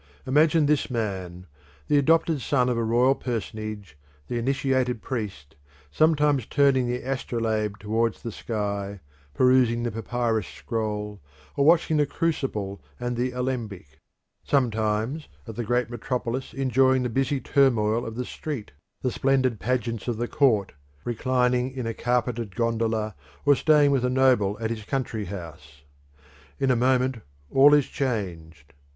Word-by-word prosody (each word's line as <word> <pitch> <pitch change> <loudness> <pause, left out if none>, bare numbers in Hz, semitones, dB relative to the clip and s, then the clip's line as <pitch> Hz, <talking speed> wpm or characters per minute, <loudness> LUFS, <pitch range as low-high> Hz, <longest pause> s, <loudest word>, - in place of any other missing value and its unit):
Imagine 150 +3 +4
this 145 -1 +1
man, 95 -7 -4 0.4
the 145 - +4
adopted 160 0 +2
son 125 -1 +1
of 120 - 0
a - - 0
royal 120 +4 +3
personage, 110 - -5 0.3
the 120 - -1
initiated 130 -2 0
priest, 95 - -5 0.4
sometimes 150 - +2
turning 135 -3 +3
the 125 +1 -2
astrolabe 110 -5 -1
towards 110 +2 -1
the 115 - -4
sky, 100 -2 -3 0.4
perusing 125 -2 +3
the 120 - -1
papyrus 115 -1 -1
scroll, 105 -3 -4 0.3
or 140 - +2
watching 160 -1 +4
the 145 -1 +3
crucible 130 -12 -2 0.2
and 120 0 -2
the 125 +2 0
alembic; 115 - -4 0.4
sometimes 115 +2 0 0.2
at 115 - -7
the 120 - -3
great 120 +2 0
metropolis 125 +1 -3
enjoying 130 -1 +3
the - - 0
busy 135 +3 0
turmoil 120 -5 +2
of 115 -2 -6
the 125 +1 -3
street, 140 -8 -6 0.3
the 125 - +1
splendid 130 -4 +1
pageants 120 -1 -2
of 120 -3 -1
the 120 +1 -2
court, 115 -10 +2 0.3
reclining 125 +1 +1
in 130 -2 -5
a 115 - -2
carpeted 120 -4 -1
gondola 115 -2 0 0.3
or 145 - +7
staying 150 0 +4
with 135 -3 +1
a 125 - +2
noble 125 -6 +3
at 115 0 -2
his 110 -2 -4
country 115 -3 -3
house. 80 -7 -9 0.8
In 135 -1 +2
a - - +3
moment 130 +1 +2 0.3
all 145 +2 +7
is 145 -3 +3
changed. 85 - -4
120 Hz, 145 wpm, -25 LUFS, 110-130 Hz, 0.8 s, or